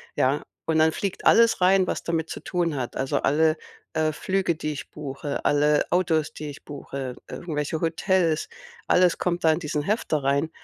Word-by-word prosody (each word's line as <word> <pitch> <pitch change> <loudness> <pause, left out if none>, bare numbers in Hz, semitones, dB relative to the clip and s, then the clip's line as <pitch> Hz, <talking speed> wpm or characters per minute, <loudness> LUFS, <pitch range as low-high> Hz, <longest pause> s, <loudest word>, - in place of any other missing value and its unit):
ja? 135 +3 +2 0.2
Und 160 -1 +1
dann 160 0 +5
fliegt 195 +4 -4
alles 230 -4 +5
rein, 185 +1 +5
was - - -2
damit 165 -1 -2
zu - - -5
tun 170 -4 -1
hat. 125 -3 -4
Also, 135 +2 -1
alle, 155 +2 +3 0.4
äh, 155 0 +1
Flüge, 185 +2 -1
die 155 -1 -3
ich 140 - -8
buche, 145 -1 -5
alle 150 +1 +3
Autos, 160 -4 +1
die 150 -1 -6
ich 145 - -11
buche, 135 -3 -6
irgendwelche 155 -2 -3
Hotels, 165 0 +1 0.4
alles 180 -1 +4
kommt 175 -1 -1
da 160 - +5
in 155 - 0
diesen 150 -3 -2
Hefter 160 - -1
rein. 140 +3 +1
155 Hz, 180 wpm, -25 LUFS, 145-175 Hz, 0.4 s, dann